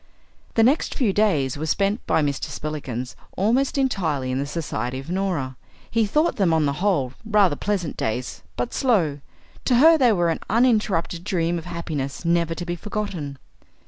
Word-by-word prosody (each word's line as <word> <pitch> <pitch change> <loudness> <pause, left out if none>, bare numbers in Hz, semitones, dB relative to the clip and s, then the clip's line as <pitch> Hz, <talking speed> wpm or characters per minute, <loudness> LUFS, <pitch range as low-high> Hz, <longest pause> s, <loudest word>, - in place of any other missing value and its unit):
The 225 - +5
next 270 +7 +2
few 230 -9 +1
days 150 - +1
were 155 - -2
spent 200 +6 +1
by 160 - +3
Mr. 140 -2 -1
Spillikins 145 -5 -5 0.2
almost 245 +9 +2
entirely 160 - 0
in 130 - -1
the 140 - -2
society 130 -6 -3
of 135 +5 -7
Norah. 175 -9 -1 0.3
He 225 -2 +2
thought 305 +9 +1
them 180 -6 +3
on 155 -2 +2
the 140 - +1
whole 155 -11 +1
rather 210 -7 +3
pleasant 185 -2 -2
days, 120 +3 -3 0.2
but 125 - -2
slow. 180 - +2 0.5
To 250 - +3
her 320 +6 +7
they 250 -3 +5
were 175 -5 +2
an - - -2
uninterrupted 215 -7 +2
dream 175 -3 0
of 160 - -11
happiness 160 -4 -4
never 170 -1 +2
to 175 - -5
be 175 0 -2
forgotten. 175 -7 -4
170 Hz, 175 wpm, -23 LUFS, 145-210 Hz, 0.5 s, her